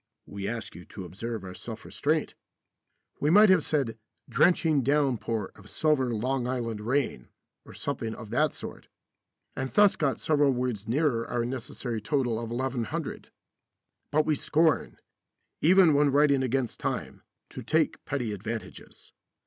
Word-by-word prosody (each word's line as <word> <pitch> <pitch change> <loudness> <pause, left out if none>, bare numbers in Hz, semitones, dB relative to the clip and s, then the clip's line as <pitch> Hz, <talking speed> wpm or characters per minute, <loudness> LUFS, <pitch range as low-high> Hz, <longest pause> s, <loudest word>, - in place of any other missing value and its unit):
(We 100 0 -6
ask 115 +1 -4
you 90 - -10
to 95 +1 -9
observe 110 +4 -5
our 90 -1 -7
self 110 +3 -8
restraint. 155 +1 -1 0.9
We 145 - +1
might 210 +5 +7
have 180 -5 +4
said 135 -7 -1 0.3
"drenching 160 -4 +3
downpour 125 -7 0
of 100 +1 -15
silver 145 -5 +1
Long 125 +3 -1
Island 115 -4 -3
rain," 120 - -1 0.4
or - - -12
something 110 -1 -3
of 110 -3 -10
that 150 +4 +2
sort, - - -9 0.7
and 130 0 -3
thus 205 +4 +5
got 140 -4 0
several 145 -3 +3
words 120 -4 -2
nearer 125 -2 +1
our 120 -1 -1
necessary 120 -2 -4
total 120 -1 0
of 115 -1 -5
1100. 120 -1 -3 0.8
But 155 +1 +2
we 155 - +2
scorn, 160 +2 +1 0.6
even 175 0 +6
when 145 0 +4
writing 140 -1 +4
against 130 -1 -1
time, - - -3 0.3
to - - -8
take - - 0
petty 125 -6 -2
advantages. 110 +3 -7
130 Hz, 145 wpm, -28 LUFS, 115-145 Hz, 0.9 s, might